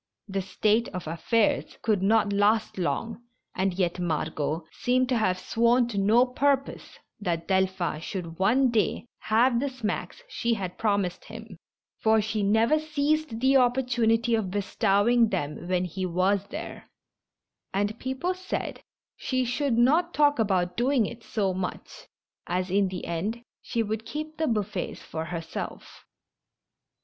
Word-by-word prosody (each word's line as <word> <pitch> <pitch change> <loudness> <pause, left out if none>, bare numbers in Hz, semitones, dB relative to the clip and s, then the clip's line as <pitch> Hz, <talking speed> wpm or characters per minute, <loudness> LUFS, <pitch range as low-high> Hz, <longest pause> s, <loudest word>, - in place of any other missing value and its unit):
This 195 -1 -4
state 220 +4 +2
of 180 - -5
affairs 205 +7 0
could 215 -4 +1
not 210 +1 +3
last 205 0 +2
long, 225 +6 -2 0.3
and 190 +1 0
yet 180 -1 0
Margot 160 -1 -2
seemed 255 +1 +1
to 250 - +2
have 185 -4 +1
sworn 235 +4 +2
to 205 -4 -2
no 220 +5 +5
purpose 275 +2 -1 0.2
that 170 -5 -2
Delphin 190 -4 0
should 170 -1 -6
one 245 +7 +3
day 220 0 0
have 235 +3 +3
the 280 +2 -1
smacks 255 - -4
she 235 - -1
had 185 -4 -5
promised 200 -5 0
him, - - -10 0.4
for 220 0 +4
she 215 0 -1
never 220 +9 +3
seized 305 -5 -1
the 265 +1 +4
oppor 255 0 +4
tunity 230 -1 +2
of 215 -4 -1
bestowing 205 +3 +2
them 160 -3 -3
when 180 0 +1
he 185 +2 -3
was 190 +3 +1
there; - - -8 0.8
and 205 +3 -1
peo 260 0 -3
ple 355 +7 -1
said 370 +1 -4 0.3
she 255 -1 -1
should 250 0 0
not 315 +9 +3
talk 290 -3 +4
about 185 -4 +1
doing 245 -1 +2
it 230 +2 -8
so 195 -4 -1
much, 180 0 -6 0.4
as 180 +1 -1
in 200 0 +3
the 185 -1 -5
end 205 +8 -3 0.2
she 230 -2 -1
would 220 +1 -4
keep 310 +1 -5
the 315 - 0
buffets 210 -4 -2
for 160 0 -5
herself. 165 -1 -7
215 Hz, 150 wpm, -27 LUFS, 185-245 Hz, 0.8 s, no